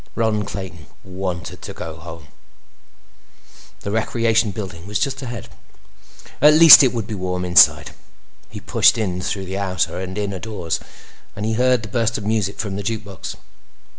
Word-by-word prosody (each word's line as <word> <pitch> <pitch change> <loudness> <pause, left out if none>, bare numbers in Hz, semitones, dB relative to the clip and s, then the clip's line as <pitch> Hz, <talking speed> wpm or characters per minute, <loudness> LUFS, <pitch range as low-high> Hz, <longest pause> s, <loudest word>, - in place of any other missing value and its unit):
Ron 110 -2 0
Clayton 90 -6 -8 0.2
wanted 95 -2 -6
to - - -8
go 80 -1 -8
home. 80 -3 -11 1.5
The 100 - -5
Recreation 115 0 +1
Building 95 -4 -8
was 105 0 -2
just 135 +3 -2
ahead; 120 -5 -7 0.9
at 150 +2 +7
least 160 -1 +10
it 130 -3 +3
would 115 -3 -4
be 110 - -7
warm 90 -2 -3
inside. 90 0 +5 0.6
He - - -9
pushed - - +3
in 90 -5 -2
through 95 +1 -4
the 95 +1 -5
outer 90 -2 -2
and 95 +1 -6
inner 100 -2 -3
doors, 100 -6 -4 0.6
and 105 - -5
he 110 - -1
heard 125 0 +2
the - - -6
burst 115 +2 -1
of 105 - -7
music 105 -2 -1
from 100 -2 -4
the - - -4
jukebox. 105 -2 -6
100 Hz, 165 wpm, -20 LUFS, 95-115 Hz, 1.5 s, least